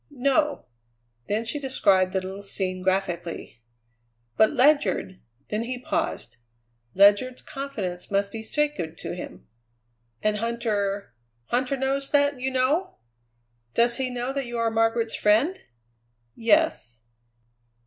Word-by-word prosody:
"No." 285 +2 +1 0.6
Then 220 +3 -1
she 265 +6 -3
described 195 -9 +2
the 190 - 0
little 190 +2 -7
scene 185 -2 -3
graphically. 175 -8 -2 0.7
"But 220 - +5
Ledyard 280 -8 +2
" 120 +4 -42
Then 210 +1 -1
he 250 +2 -3
paused. 320 +6 -3 0.6
Ledyard's 205 +6 +4
confidence 210 -11 -5
must 200 0 0
be 225 - -5
sacred 220 - -1
to - - -5
him. - - -9 0.8
"And 215 0 +2
Huntter 210 - -2 0.4
Huntter 255 +2 +1
knows 270 +1 -1
that 285 -2 +2
you 265 - 0
know; 265 +8 0 0.8
does 235 0 +3
he 260 -1 -1
know 250 +1 -3
that 275 -2 -3
you 240 0 -4
are 230 -1 +1
Margaret's 225 0 +1
friend?" 230 - +3 0.8
"Yes." 230 - +1
235 Hz, 125 wpm, -25 LUFS, 200-270 Hz, 0.8 s, But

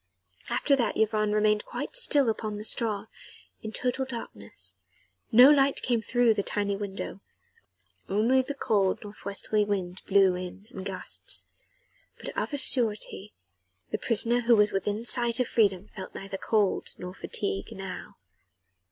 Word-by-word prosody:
After 280 - +2
that 235 -5 -1
Yvonne 215 -1 +1
remained 210 0 +2
quite - - -5
still 295 - +5
upon 215 -1 -2
the 210 - -6
straw, 215 -2 +1 0.6
in 220 - -6
total 250 +3 -1
darkness: 100 - -8 0.6
no 250 +5 +9
light 275 -1 +3
came 240 -2 +1
in - - -10
through 245 0 +3
the 210 - -1
tiny 200 0 -1
window, 195 -1 -6 0.9
only 230 +7 +3
the 280 +2 -6
cold 200 -8 +1
north 205 0 -12
westerly 205 +1 0
wind 190 -3 -3
blew 195 -2 +4
in 180 +2 -7
in 190 - -7
gusts. 195 - 0 0.7
But - - -8
of - - -2
a 285 - -2
surety 215 -5 +1 0.6
the - - -2
prisoner 235 +1 +1
who 235 0 +4
was 210 -1 +4
within 205 +3 -2
sight 240 -1 +3
of 250 - +1
freedom 200 -3 +1
felt 190 -2 -8
neither 195 0 -6
cold 210 -4 0
nor 180 0 -7
fatigue 95 - -4
now. 190 -1 -8
210 Hz, 150 wpm, -27 LUFS, 195-240 Hz, 0.9 s, no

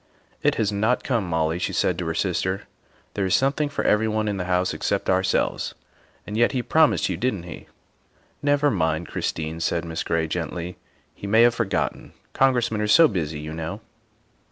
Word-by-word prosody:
" - - -38
It - - +2
has 110 -2 0
not 110 +5 +1
come, 115 -8 -1
Molly," 80 0 0
she - - -2
said - - +1
to - - -3
her - - -2
sister. 95 +1 -1 0.3
" - - -35
There 100 -2 -1
is 95 - +3
something 140 +2 +1
for 145 - -3
everyone 110 0 +1
in 100 -1 -1
the 90 - -3
house 90 0 +1
except - - -1
ourselves. 95 0 0 0.5
And 105 - -6
yet 120 +4 +3
he 125 -2 -1
promised 160 +3 +3
you, 95 - -2
didn 105 -3 -1
't - - -13
he? 85 - -9 0.2
" - - -40
" - - -37
Never 145 0 +3
mind, 80 -4 -1
Christine," 80 +1 -3
said 85 +1 -1
Miss 80 -1 -4
Gray 85 -1 0
gently, 85 +1 -4 0.2
" - - -38
he 100 - -8
may 110 +3 +5
have 120 0 +5
forgotten. 100 -7 -2 0.2
Congressmen 120 -5 +2
are 105 - 0
so 165 +10 +7
busy, 80 -7 -3
you 75 +1 -6
know." 80 +5 -5
95 Hz, 205 wpm, -24 LUFS, 85-115 Hz, 0.5 s, so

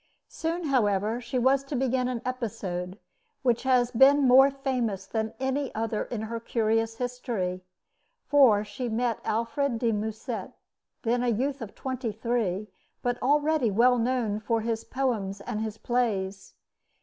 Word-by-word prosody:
Soon, 330 +2 -3
however, 220 -5 +1
she 240 +2 -3
was 265 +2 +3
to 275 - -4
begin 255 -1 +1
an 245 -2 -3
episode 200 -7 -4 0.5
which 240 -3 +2
has 250 -2 +2
been 270 +3 +6
more 265 +2 +8
famous 250 -8 -2
than 220 +1 -2
any 265 +1 -1
other 220 -1 -1
in 225 -3 -4
her 230 +1 -4
curious 225 0 0
history, 230 -7 -3 0.6
for 245 -8 +5
she 225 +4 -4
met 230 +1 0
Alfred 235 +3 -1
de 230 0 +1
Musset, 220 0 -4 0.5
then 240 +1 +1
a 250 - 0
youth 265 +4 0
of 215 -3 -7
twenty 255 -3 -3
three, 215 -3 -1 0.4
but 245 0 -1
already 295 -1 +2
well 240 +4 +4
known 230 -3 0
for 225 +1 0
his 225 0 -2
poems 220 -7 -2
and 210 +1 -4
his 220 -1 -4
plays. 205 -6 -2
235 Hz, 150 wpm, -27 LUFS, 220-255 Hz, 0.6 s, more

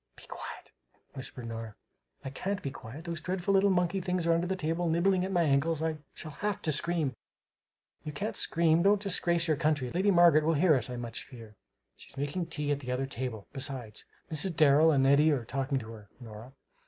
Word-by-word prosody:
"Be - - -13
quiet," - - -9 0.4
whispered 130 -3 -7
Nora. 115 -2 -6 0.5
"I 135 - -4
can't 195 +8 -3
be 140 - -3
quiet! 130 +6 -10
Those 170 -2 -4
dreadful 185 +2 -1
little 195 +1 +4
monkey 185 +1 +1
things 180 -1 -1
are 170 - +4
under 170 +2 0
the 190 - -1
table, 165 0 -1
nibbling 180 +3 +2
at 190 - -3
my 175 -2 +2
ankles, 155 +2 +1
I 160 -1 -2 0.2
shall 155 - -7
have 205 -1 -1
to 155 - +1
scream!" 155 -1 0 0.9
"You 150 - -5
can't 200 +9 -4
scream. 165 0 +2
Don't 200 +2 +4
disgrace 175 -3 +1
your 155 -2 +2
country. 150 -6 0
Lady 190 +4 +1
Margaret 170 -4 +6
will 165 +2 +2
hear 160 +2 +4
us, 125 -3 0
I 125 - -4
much 120 -1 -5
fear!" 115 -4 -12 0.4
"She's - - -16
making 145 +5 -2
tea 150 -1 -2
at 145 - 0
the 125 -3 -5
other 130 +2 -1
table. 125 -5 -5
Besides, 130 -5 -4 0.3
Mrs. 165 +3 0
Darrel 155 +1 +6
and 135 -4 +3
Eddy 140 +3 +5
are 130 -5 -1
talking 135 +2 -1
to 115 -3 -6
her, 105 -2 -12
Nora. 115 +1 -11
155 Hz, 205 wpm, -30 LUFS, 130-175 Hz, 0.9 s, Margaret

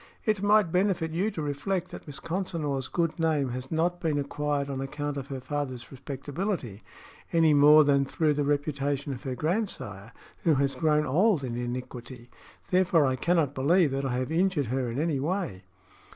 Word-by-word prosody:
"It 215 -4 +1
might 205 -4 +4
benefit 180 -3 +1
you 185 +6 0
to 165 -7 -5
reflect 175 +6 -2
that - - -10
Miss 140 -2 -7
Consinor's 160 -7 -2
good 170 0 -1
name 155 -5 +1
has 130 +1 -5
not 175 +2 0
been 155 -3 0
acquired 145 0 -1
on 135 -1 -4
account 145 +1 -4
of 140 -1 -5
her 135 -2 -5
father's 130 -3 -4
respectability, 135 - -4 0.5
any 165 -2 +4
more 150 +2 +8
than 140 -1 +3
through 155 +2 +1
the 145 0 0
reputation 145 -1 -1
of 125 - -8
her 130 -3 -4
grandsire, 150 - -2 0.3
who 160 -3 +4
has 140 0 +1
grown 150 -2 +2
old 175 - +3
in 120 -2 -3
iniquity. 120 0 -6 0.4
Therefore, 180 -4 +4
I 130 -1 +1
cannot 165 -2 +1
believe 150 +4 +3
that 135 +1 -2
I 135 -2 -1
have 130 +3 -2
injured 170 -3 +1
her 130 -2 -1
in 115 - -4
any 155 -3 0
way." 140 - -3
145 Hz, 180 wpm, -28 LUFS, 135-170 Hz, 0.5 s, more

